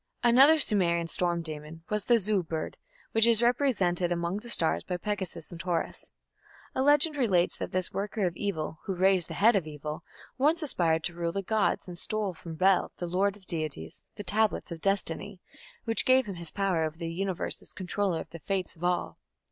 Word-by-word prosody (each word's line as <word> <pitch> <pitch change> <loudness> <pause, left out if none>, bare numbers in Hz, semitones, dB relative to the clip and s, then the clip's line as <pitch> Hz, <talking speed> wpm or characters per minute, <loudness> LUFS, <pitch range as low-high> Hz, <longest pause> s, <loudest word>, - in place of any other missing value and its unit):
Another 265 +6 +7
Sumerian 175 - +3
storm 170 0 0
demon 155 +1 -8
was 210 -1 -1
the 240 - +5
Zu 210 -2 +1
bird, 160 -2 -5 0.4
which 225 +1 +5
is 230 -2 +5
represented 195 -9 +1
among 170 +2 -1
the 235 +3 -9
stars 165 -8 +1
by 180 - -3
Pegasus 190 -4 -4
and 170 - -9
Taurus. 175 -2 -3 0.6
A - - -1
legend 295 +2 +5
relates 190 -9 +2
that - - -5
this 185 -1 0
"worker 205 0 -2
of 175 -2 -2
evil, 160 -6 -3
who 190 - -2
raised 185 -1 +5
the - - -6
head 225 +3 +5
of 180 -5 0
evil", 150 0 -6 0.4
once 310 +5 +2
aspired 165 - +1
to 175 - -3
rule 170 0 -2
the 195 +2 -3
gods, 215 0 0
and 175 -1 -8
stole 215 -3 -2
from 165 -1 -9
Bel, 185 +2 +3
"the 175 - -4
lord" 195 +3 0
of 195 - -22
deities, 155 - -4
the 205 - -7
Tablets 210 +1 0
of 165 -1 -7
Destiny, 195 0 -2 0.4
which 225 -1 0
gave 260 0 +4
him 200 - -5
his 170 -2 -6
power 195 -5 0
over 155 0 -3
the 165 -1 -5
Universe 190 0 -3
as - - -9
controller 185 -1 -2
of - - -11
the 165 - -9
fates 185 +1 -2
of 165 - -13
all. 180 0 -1
185 Hz, 200 wpm, -28 LUFS, 170-210 Hz, 0.6 s, Another